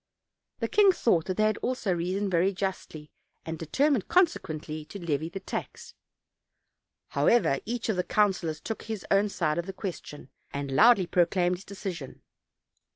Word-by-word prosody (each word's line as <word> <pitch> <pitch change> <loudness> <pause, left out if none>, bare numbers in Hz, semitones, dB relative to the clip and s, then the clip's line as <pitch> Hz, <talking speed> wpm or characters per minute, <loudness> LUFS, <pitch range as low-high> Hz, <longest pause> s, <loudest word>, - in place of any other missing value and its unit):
The - - +1
king 415 -2 +5
thought 185 - +1
that 185 - -3
they 215 0 +3
also 245 -6 -1
reasoned 185 +4 -1
very 180 +3 +3
justly, 185 -5 -5 0.3
and 160 -1 -5
determined, 265 - +1
consequently, 155 - 0
to 200 - -9
levy 160 -3 -2
the 195 - -6
tax. - - -6 1.2
However, 230 - +3
each 235 0 -3
of 215 -4 0
the 180 - +1
councilors 185 -7 +1
took 225 +6 -5
his 220 -4 -6
own 200 +1 +4
side 165 -4 -1
of 170 - -4
the 195 - -5
question, 175 -7 -7 0.2
and 140 -1 -4
loudly 210 - +6
proclaimed 180 +1 +2
his 190 - -14
decision. 185 -9 -7
185 Hz, 155 wpm, -28 LUFS, 165-215 Hz, 1.2 s, loudly